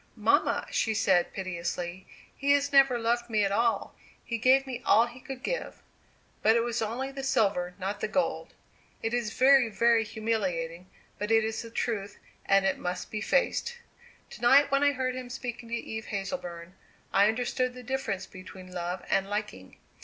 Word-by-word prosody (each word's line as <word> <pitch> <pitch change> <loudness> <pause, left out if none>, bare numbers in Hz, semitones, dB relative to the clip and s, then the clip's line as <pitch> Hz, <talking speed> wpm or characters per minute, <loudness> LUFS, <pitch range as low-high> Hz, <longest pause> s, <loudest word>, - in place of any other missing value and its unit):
"Mamma," - - +2
she 220 -1 0
said, 190 -4 +2
piteously, 175 0 -4 0.3
"he 280 0 +2
has 285 0 +1
never 270 -3 +6
loved 235 +1 0
me 215 -2 +2
at 195 - -1
all. 230 +3 +1 0.3
He 235 -1 -3
gave 260 +3 +4
me 255 -2 -6
all 225 -1 +5
he 240 +1 -11
could 260 0 -8
give; - - -4 0.6
but 220 +1 +4
it 235 - +3
was 235 0 -2
only 240 +5 -3
the 275 0 -6
silver, 195 -9 +1
not 200 +2 -4
the - - -1
gold. 275 +6 -2 0.5
It 225 +1 -1
is 240 -3 -1
very, 265 -2 +5
very 230 +1 +3
humiliating, 185 -6 -3 0.3
but 210 - -3
it 225 0 +4
is 220 0 -2
the 230 - -9
truth, 210 -3 -3 0.3
and 195 0 +4
it 190 - +1
must 180 0 -4
be 215 - -3
faced. 480 - 0 0.5
To - - -11
night 275 +4 +6
when 275 0 +3
I 285 0 +4
heard 255 -1 -1
him 255 -1 -6
speaking 245 -2 -6
to 235 - -1
Eve 220 -1 -5
Hazleburn, 185 -4 -5 0.4
I 200 +1 +5
understood 250 +2 -1
the 250 - -9
difference 245 -6 -3
between 185 0 -12
love 175 +1 -4
and 195 0 +1
liking. 205 - -5
225 Hz, 180 wpm, -28 LUFS, 195-255 Hz, 0.6 s, never